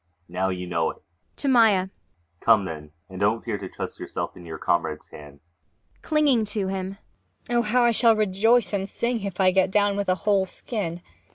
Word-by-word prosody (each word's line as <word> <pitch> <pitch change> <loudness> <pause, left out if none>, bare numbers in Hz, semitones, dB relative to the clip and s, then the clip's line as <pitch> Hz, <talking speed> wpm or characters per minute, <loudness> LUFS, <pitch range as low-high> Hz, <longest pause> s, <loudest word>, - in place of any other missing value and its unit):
Now, 90 +2 -1
you 90 -1 -4
know 85 -2 0
it. - - -10 0.3
[To 285 - -3
MAIA.] 215 -7 +4 0.5
Come, 110 -4 +4
then 75 -3 -7 0.2
and 95 -1 -9
don't 105 +3 +1
fear - - -3
to - - -7
trust - - -6
yourself - - -5
in 90 -1 -12
your 80 -1 -6
comrade's 80 -3 -1
hands. 75 -1 -13
MAIA. 90 +2 -40
[Clinging 290 -7 +3
to 205 -2 -1
him.] 190 0 -4 0.5
Oh, 240 0 +3
how 240 +2 +2
I 240 - +4
shall 230 0 +4
rejoice 215 +2 +2
and 195 0 -2
sing, 235 -1 -2
if 195 -1 -5
I 185 -1 +5
get 190 0 +2
down 205 0 +2
with 200 -1 -2
a 185 - +3
whole 200 -2 +3
skin! 175 -6 -5
190 Hz, 195 wpm, -24 LUFS, -, 0.5 s, I